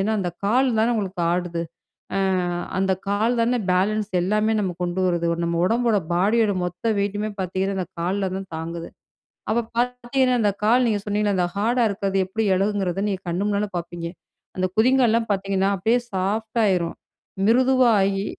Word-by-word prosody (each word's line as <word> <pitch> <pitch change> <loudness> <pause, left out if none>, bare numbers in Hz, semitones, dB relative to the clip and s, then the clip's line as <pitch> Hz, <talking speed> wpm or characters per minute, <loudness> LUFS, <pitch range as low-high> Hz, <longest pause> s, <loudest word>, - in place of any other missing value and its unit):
ஏன்னா 215 +3 +1
அந்த 180 -2 -1
கால் 255 +6 +3
தான 230 +2 +3
உங்களுக்கு 195 -4 -3
ஆடுது? 175 -1 -2 0.5
அ - - +1 0.6
அந்த 190 0 +2 0.2
கால் 220 +4 +1
தான 240 +2 +2
பேலன்ஸ் 210 +3 +1
எல்லாமே 215 +3 +1
நமக்கு 180 -2 -3
கொண்டு 175 +2 -2
வருது? 170 -1 0 0.2
நம்ம 170 0 -1
உடம்போட, 230 -1 +2
பாடியோட 205 +3 +2
மொத்த 180 +6 -2
வெயிட்டுமே 205 +2 -1
பார்த்தீங்கன்னா 190 +1 -1
அந்த 185 - -2
கால்ல 190 +2 -1
தான் 195 -1 -6
தாங்குது. 170 +1 -5 0.6
அப்ப 235 +1 +1
பார்த்தீங்கன்னா, 250 +1 +1
அந்த 205 - +3
கால் 240 +4 +4
நீங்க 210 -2 0
சொன்னீங்களே 205 -1 0
அந்த 175 -1 +2
ஹார்டா 235 +4 +2
இருக்குறது 195 -1 -1
எப்படி 220 +3 -2
எளகும்ங்கிறத 195 -1 0
நீங்க 190 -1 -3
கண்ணு 180 +4 -1
முன்னால 205 0 0
பார்ப்பீங்க. 170 0 -5 0.5
அந்த 185 0 +1
குதிங்கால்லாம் 230 -1 +3
பார்த்தீங்கன்னா, 195 0 0
அப்டியே 225 +6 +2
சாஃப்டா 220 +4 0
ஆயிரும் 170 -3 -1 0.5
மிருதுவாகி 230 -6 +3
200 Hz, 155 wpm, -23 LUFS, 185-225 Hz, 0.6 s, கால்